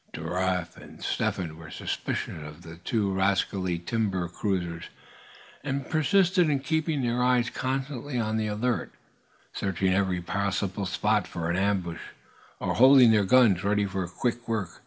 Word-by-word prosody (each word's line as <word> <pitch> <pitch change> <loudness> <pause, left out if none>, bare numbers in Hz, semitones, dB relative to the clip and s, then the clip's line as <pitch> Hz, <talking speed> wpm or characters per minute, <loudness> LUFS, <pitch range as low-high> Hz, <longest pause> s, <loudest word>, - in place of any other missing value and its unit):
Giraffe 90 +1 -2
and - - -13
Step - - 0
Hen 80 -4 -5
were 80 -1 -11
suspicious 80 - -4
of 75 +3 -10
the 80 0 -10
two 100 +1 -1
rascally 95 -1 0
timber 95 -1 -1
cruisers, 85 -2 -3 0.8
and 135 -1 -3
persisted 180 +2 +3
in 145 - +2
keeping 155 -1 0
their 120 0 0
eyes 125 -1 +2
constantly 135 0 -3
on 110 -1 0
the 110 -1 0
alert, 110 +4 -1 0.6
searching 95 -1 0
every 95 -2 +1
possible 95 +1 -2
spot 105 +2 +1
for 85 0 -3
an - - 0
ambuscade, 95 -3 -1 0.6
and - - -2
holding 130 -1 +8
their 105 -2 +3
guns 105 -5 +5
ready 100 +1 +2
for 95 -2 -3
quick 120 +6 -3
work. 110 -6 -3
100 Hz, 150 wpm, -27 LUFS, 90-125 Hz, 0.8 s, holding